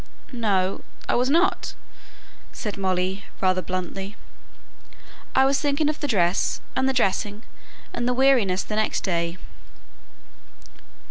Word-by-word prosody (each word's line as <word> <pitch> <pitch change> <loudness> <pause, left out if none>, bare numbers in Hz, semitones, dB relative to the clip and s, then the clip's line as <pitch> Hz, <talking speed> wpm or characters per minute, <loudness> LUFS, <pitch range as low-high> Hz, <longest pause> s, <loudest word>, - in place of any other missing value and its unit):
"No, 195 -5 +1 0.3
I - - +1
was 250 +2 +2
not," 350 +5 +2 0.8
said 210 -3 -4
Molly, 190 0 -1
rather 185 -1 +2
bluntly. 185 +2 -4 1.2
"I 265 - +6
was 275 +1 +2
thinking 290 0 +2
of 305 - -3
the 290 - -1
dress, 185 -6 +2 0.2
and 265 0 +2
the - - +3
dressing, 210 -3 0 0.5
and 240 - -1
the 250 - +2
weariness 245 -8 +4
the 215 - -4
next 215 - +1
day." 170 -2 -1
210 Hz, 125 wpm, -24 LUFS, 185-265 Hz, 1.2 s, I